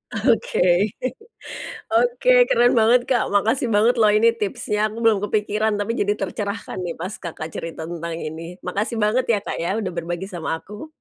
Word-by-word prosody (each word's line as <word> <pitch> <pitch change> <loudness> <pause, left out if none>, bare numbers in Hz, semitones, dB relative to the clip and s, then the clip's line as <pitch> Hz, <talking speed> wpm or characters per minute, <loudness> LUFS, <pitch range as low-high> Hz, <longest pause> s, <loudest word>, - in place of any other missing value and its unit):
Oke. 225 +1 +1 1.3
Oke. - - +2 0.2
Keren 245 +1 +4
banget, 235 +3 +5
Kak, 240 -4 +2
makasih 225 +5 +2
banget 230 +4 +4
loh 215 - +6
ini 230 +2 +5
tipsnya, 210 +1 -2
aku 215 - -9
belum 220 -3 +4
kepikiran 215 +1 0
tapi 205 +2 -2
jadi 205 0 +2
tercerahkan 200 +1 -4
nih 170 - -4
pas 185 +4 -4
Kakak 160 -1 -6
cerita 165 -1 -6
tentang 170 0 -5
ini, 165 +2 -6
makasih 215 +4 -2
banget 245 +5 +2
ya, 225 -3 +2
Kak, - - -4
ya 170 +4 -1
udah 210 -4 -2
berbagi 175 +1 -4
sama 170 -3 -5
aku 210 - -10
210 Hz, 170 wpm, -22 LUFS, 175-225 Hz, 1.3 s, loh